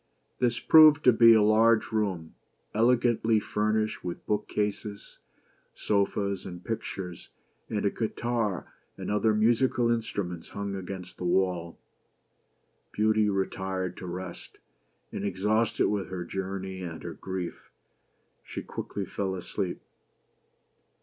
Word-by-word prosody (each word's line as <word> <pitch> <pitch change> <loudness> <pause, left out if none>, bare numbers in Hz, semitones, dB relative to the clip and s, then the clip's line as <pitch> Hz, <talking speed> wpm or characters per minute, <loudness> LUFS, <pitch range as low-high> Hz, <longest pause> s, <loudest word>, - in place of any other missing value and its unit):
This 120 -1 +2
proved 155 -2 +7
to 125 - +7
be 115 0 +8
a 110 - +5
large 110 +2 +4
room, 95 -7 -1 0.4
elegantly 115 -1 +3
fur 105 +1 -1
nished 110 0 -1
with 90 -1 -6
book 105 0 -1
cases, 105 0 -4 0.6
sofas, 100 -1 0
and 90 -1 -9
pictures; 95 -5 -5 0.4
and 105 -2 -1
a 100 - +3
guitar 115 -4 -2 0.2
and - - -4
other 105 +1 +2
musical 120 +2 +3
instruments 100 -7 -3
hung 100 0 -4
against 95 -1 -7
the - - -5
wall. 90 -2 0 1.1
Beauty 110 0 +2
retired 95 -2 -2
to 90 - -7
rest; 90 0 -7 0.5
and - - -5
exhausted 105 +3 +1
with 105 -2 -1
her 90 -2 -5
journey 95 0 -4
and 85 -3 -6
her 85 - -5
grief, 90 -2 -6 0.7
she - - -6
quickly 100 -1 -5
fell 95 -1 -3
asleep. 90 0 -4
100 Hz, 125 wpm, -28 LUFS, 95-110 Hz, 1.1 s, be